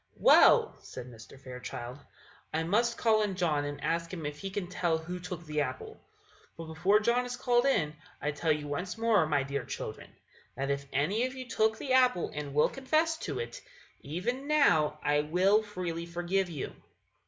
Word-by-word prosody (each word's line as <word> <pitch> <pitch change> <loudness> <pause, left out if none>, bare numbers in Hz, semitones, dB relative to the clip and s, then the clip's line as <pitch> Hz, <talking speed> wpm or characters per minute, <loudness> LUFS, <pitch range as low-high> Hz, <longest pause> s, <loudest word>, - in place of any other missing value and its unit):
"Well," - - +6
said 125 - -9
Mr. 115 +1 -13
Fairchild, 125 -1 -7 0.5
"I 160 +1 0
must 230 +7 +1
call 220 -2 +3
in 205 -3 -1
John, 155 -5 0
and 145 0 -5
ask 170 0 -1
him 165 -5 -6
if 145 0 -5
he 195 - -4
can 195 -1 -3
tell 175 -2 0
who 175 +3 -6
took 175 -1 -7
the 150 -1 -1
apple. 130 -2 -5 0.6
But 165 - -7
before 175 +6 +2
John 235 +3 +2
is 245 0 -5
called 245 +1 +2
in, 150 - +1 0.2
I 150 - -1
tell 150 +2 0
you 150 -1 -1
once 180 +7 -4
more, 225 -7 +3
my 145 -3 +1
dear 140 +1 -3
children, - - -6 0.5
that 140 +1 -2
if 140 0 -3
any 195 - +1
of 260 - -9
you 255 -1 -7
took 220 -1 +1
the 260 +1 -2
apple 250 -8 +3
and 150 -1 -5
will 150 - +4
confess 315 +4 0
it, - - -4 0.4
even 235 - -3
now 225 - +3
I 145 0 +3
will 185 +8 +3
freely 180 -5 -5
forgive 175 +2 -1
you." 150 -6 -5
175 Hz, 185 wpm, -30 LUFS, 150-220 Hz, 0.6 s, Well